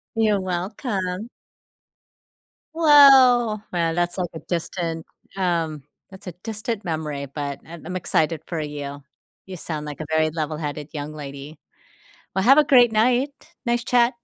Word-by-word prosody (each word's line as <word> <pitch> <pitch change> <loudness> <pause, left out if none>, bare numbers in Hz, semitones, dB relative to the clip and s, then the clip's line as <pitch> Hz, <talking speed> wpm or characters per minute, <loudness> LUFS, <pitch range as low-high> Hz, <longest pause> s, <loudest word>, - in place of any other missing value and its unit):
You're 215 -3 +2
welcome! 190 +2 -3 1.5
Whoa. 265 -8 +6
Well, 165 -2 0
that's, 175 0 -1
like, 175 -2 -2
a 160 - -7
distant, 170 -1 -4 0.3
um 165 -5 -1 0.3
that's 190 +1 -14
a 180 - -5
distant 220 0 -4
memory, 155 -4 -3
but 140 0 -5
I'm 165 -1 -11
I'm 180 +1 -4
excited 160 -3 0
for 165 -2 -4
you. 145 -1 -6 0.4
You 190 -1 -7
sound 155 -2 -5
like 150 0 -7
a 155 - -7
very 160 0 +2
level-headed 150 -2 -4
young 150 0 -5
lady. 145 +1 -9 0.8
Well, 190 - 0
have 270 +5 +7
a 305 - +8
great 245 -5 +5
night. 245 +5 +2 0.3
Nice 240 -1 0
chat. 240 0 +3
175 Hz, 145 wpm, -23 LUFS, 155-220 Hz, 1.5 s, a